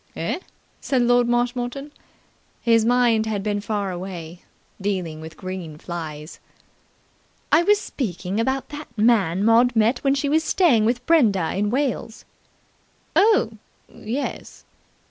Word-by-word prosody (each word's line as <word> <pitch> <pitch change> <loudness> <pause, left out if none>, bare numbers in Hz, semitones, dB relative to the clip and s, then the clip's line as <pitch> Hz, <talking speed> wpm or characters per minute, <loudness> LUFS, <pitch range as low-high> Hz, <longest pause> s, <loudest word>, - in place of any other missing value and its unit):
"Eh?" - - -2 0.4
said 260 -3 0
Lord 245 0 +3
Marshmoreton. 245 +3 -1 0.7
His 230 -2 +3
mind 235 -2 +3
had 205 -3 -2
been 205 -1 -1
far 205 -2 -2
away, 175 -2 -7 0.4
dealing 180 -6 -3
with 160 0 -10
green 185 -5 -7
flies. 155 -2 -7 1.1
"I 315 - +6
was 410 +4 +3
speaking 195 - -4
about 265 +3 -1
that 300 +1 -8
man 205 -5 +2
Maud 240 +2 +4
met 225 +3 +2
when 275 0 +3
she 280 +1 -1
was 315 +3 +2
staying 275 - +3
with 240 +2 0
Brenda 210 - +3
in 205 +2 0
Wales." 255 -2 -2 0.9
"Oh, 385 - +3 0.3
yes!" 245 +7 -5
225 Hz, 125 wpm, -22 LUFS, 190-255 Hz, 1.1 s, I